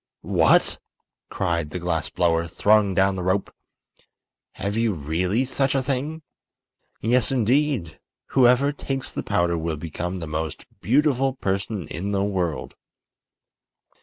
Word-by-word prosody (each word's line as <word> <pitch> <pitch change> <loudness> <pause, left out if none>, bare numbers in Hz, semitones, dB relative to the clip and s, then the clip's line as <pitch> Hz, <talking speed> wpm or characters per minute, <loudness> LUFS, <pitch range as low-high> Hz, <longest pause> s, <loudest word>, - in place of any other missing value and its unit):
"What!" - - +3 0.5
cried 85 -3 -1
the 90 - -5
glass 85 -2 -2
blower, 85 -1 +1
throwing 100 +2 +3
down 95 0 +3
the 95 - -3
rope, 95 +2 0 1.0
"have 100 +1 -3
you 115 -1 +1
really 90 - 0
such 135 +1 0
a 135 - +1
thing?" 145 +4 -3 0.8
"Yes, 120 +2 +2
indeed. 125 - +1 0.3
Whoever 130 +2 +4
takes 135 -2 -4
the - - -2
powder 85 -1 0
will 80 -1 -2
become 85 +4 -4
the 85 - -5
most 80 0 -4 0.2
beautiful 135 +1 +2
person 100 - -3
in 95 +7 -4
the 100 0 +1
world." 90 -6 -2
100 Hz, 130 wpm, -24 LUFS, 85-130 Hz, 1.0 s, Whoever